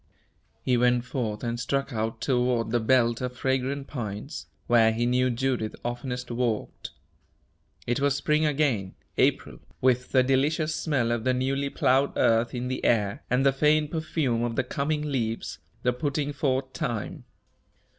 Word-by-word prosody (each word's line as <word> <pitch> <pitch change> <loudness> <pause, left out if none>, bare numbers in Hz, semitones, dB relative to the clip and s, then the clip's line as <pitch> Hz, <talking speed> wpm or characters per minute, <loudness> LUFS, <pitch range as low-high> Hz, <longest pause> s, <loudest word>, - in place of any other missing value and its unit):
He 125 -1 +2
went 125 0 +3
forth 120 -5 -3
and 120 0 -2
struck 135 +2 -1
out 110 0 -2
toward 125 -3 +1
the 120 - +2
belt 120 0 +2
of 125 0 -4
fragrant 135 +1 -1
pines, 115 0 -6 0.2
where 115 -2 +5
he 115 +2 0
knew 125 +1 +2
Judith 125 -2 -1
oftenest 125 0 -4
walked. 120 -2 -2 1.0
It 120 +2 0
was 140 0 +2
spring 150 +2 +1
again 135 -11 0 0.2
April, - - +1 0.2
with 125 0 +2
the 130 -1 +5
delicious 150 +5 +1
smell 135 -8 0
of 120 -1 -1
the 130 +1 +2
newly 135 +2 0
plowed 135 +1 +2
earth 115 0 +2
in 125 +1 -3
the 130 0 -3
air, 105 -4 +1
and 125 +2 +2
the 135 - +5
faint 150 +2 +2
perfume 155 -7 -1
of 120 -1 -2
the 130 - +1
coming 150 +4 -2
leaves 115 - -2 0.2
the 125 - +2
putting 145 +2 -2
forth 130 -2 -1
time. 115 -4 -4
125 Hz, 155 wpm, -26 LUFS, 120-140 Hz, 1.0 s, where